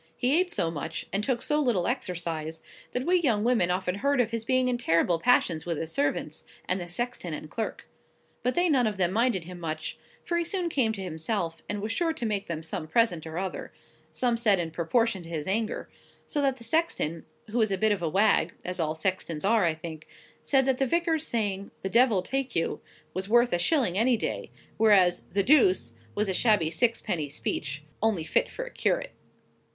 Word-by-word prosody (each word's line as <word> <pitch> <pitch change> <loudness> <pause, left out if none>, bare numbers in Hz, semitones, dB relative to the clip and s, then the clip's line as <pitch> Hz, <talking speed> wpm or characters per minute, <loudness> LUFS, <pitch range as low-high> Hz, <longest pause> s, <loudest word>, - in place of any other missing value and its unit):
He 250 +2 +2
ate 360 +2 +2
so 165 - 0
much, 145 -4 -5
and 200 +1 +1
took 240 0 0
so 300 0 +1
little 225 -11 +1
exercise, 165 -3 -3 0.3
that 250 +1 -2
we 360 +1 +4
young 225 -9 +2
women 230 -7 +2
often 180 0 0
heard 275 +7 +1
of 230 -2 +2
his 230 -1 -2
being 255 +2 +2
in 245 -1 0
terrible 170 -5 +2
passions 175 -8 +3
with 170 -2 -2
his 160 +1 -4
servants, 145 +1 -1 0.2
and 185 +1 0
the 175 - -5
sexton 180 -3 -3
and 150 - -9
clerk. 225 - -4 0.5
But 250 - 0
they 350 +1 +3
none 265 -7 +3
of 210 -2 -2
them 180 -2 +2
minded 225 -3 +1
him 180 +1 -9
much, 155 -2 -4 0.3
for 340 - 0
he - - +1
soon 350 0 -2
came 255 -8 +2
to 195 -3 -5
himself, 165 0 -3
and 205 -1 -2
was 220 - -2
sure 325 +7 0
to 240 - -4
make 210 -2 -1
them 160 -1 -4
some 155 -1 -4
present 175 -4 +1
or 160 +1 -6
other—some 230 +5 -3
said 215 -4 +4
in 165 -2 -2
proportion 195 +5 +1
to 165 - -11
his 155 -3 -3
anger; 220 +4 -1 0.4
so 295 - -1
that 270 -2 +2
the 235 - -11
sexton, 230 - 0 0.3
who 240 - 0
was 220 -2 +2
a 195 - +1
bit 220 +3 +2
of 200 -4 0
a 165 - 0
wag 200 +5 +3
(as 180 0 -3
all 155 -1 0
sextons 170 -1 -2
are, 215 -2 +4
I 165 -2 +1
think), 160 -1 -8 0.3
said 270 -2 +2
that 265 -1 +1
the 270 - +2
vicar's 330 0 +1
saying, 200 -4 -1
"The 190 - -1
Devil 230 -6 +4
take 270 +3 -2
you," 165 - 0 0.3
was 190 +2 -3
worth 240 0 +4
a 175 - +2
shilling 215 - +2
any 240 +1 +3
day, - - -3 0.3
whereas 200 -5 +4
"The 200 0 +2
Deuce" 190 - +4 0.2
was 210 0 0
a 190 - 0
shabby 185 -6 +3
sixpenny 175 - 0
speech, 145 0 -3 0.2
only 210 -7 +1
fit - - +1
for - - -5
a - - -9
curate. - - 0
205 Hz, 210 wpm, -27 LUFS, 170-245 Hz, 0.5 s, we